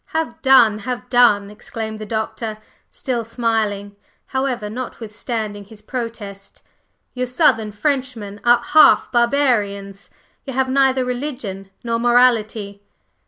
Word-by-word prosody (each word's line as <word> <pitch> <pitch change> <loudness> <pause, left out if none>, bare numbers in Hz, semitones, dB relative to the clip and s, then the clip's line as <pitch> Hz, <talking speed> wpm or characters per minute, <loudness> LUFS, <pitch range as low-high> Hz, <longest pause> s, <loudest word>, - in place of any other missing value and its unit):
"Have 320 -7 -3
done! 240 -5 +5
Have 245 +3 -5
done!" 210 -5 +4
exclaimed 220 +1 -7
the 215 - -7
Doctor, 220 0 -3 0.3
still 245 -4 -3
smiling, 220 -3 -2 0.3
however, 265 -5 -2
notwithstanding 220 -2 -5
his 210 +1 -13
protest. 215 -5 -7 0.5
"You 250 0 -2
Southern 245 -5 +2
Frenchmen 230 -4 -3
are 240 0 +4
half 310 +4 +5
barbarians, 215 -6 0 0.3
you 270 - -6
have 260 +1 0
neither 265 -1 +3
religion 245 -7 -5
nor 230 -1 -1
morality." 230 -4 +2
230 Hz, 115 wpm, -20 LUFS, 210-255 Hz, 0.5 s, done